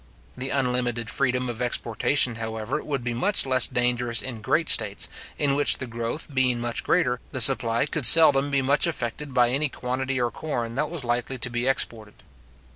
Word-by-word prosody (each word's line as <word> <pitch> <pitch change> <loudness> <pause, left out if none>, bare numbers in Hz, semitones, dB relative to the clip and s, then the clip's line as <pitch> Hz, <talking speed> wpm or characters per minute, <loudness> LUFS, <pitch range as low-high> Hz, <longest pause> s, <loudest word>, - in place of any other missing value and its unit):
The 130 +1 -5
unlimited 125 -4 -2
freedom 125 -1 -1
of 120 -1 -6
exportation, 120 +1 -1
however, 110 +5 -5
would 140 -4 -5
be 120 -1 -4
much 165 - +2
less 130 -2 +3
dangerous 120 -1 -1
in 120 -4 -8
great 160 +9 -1
states, 100 -7 +2 0.3
in 145 -2 0
which 145 +1 +3
the 130 - -6
growth 115 +6 -6
being 130 -2 +1
much 120 0 -4
greater, 125 -8 0
the 130 - -5
supply 115 +1 +5
could 150 -4 +5
seldom 145 -4 +7
be 140 -1 0
much 140 +5 +1
affected 145 -2 -5
by 125 -1 +1
any 145 +3 -1
quantity 130 +1 -4
or 120 -1 -1
corn 120 -7 -5
that 150 +4 -3
was 165 -4 -4
likely 120 +2 -3
to 125 - 0
be 120 +1 -3
exported. 110 -5 -3
125 Hz, 185 wpm, -23 LUFS, 120-140 Hz, 0.3 s, seldom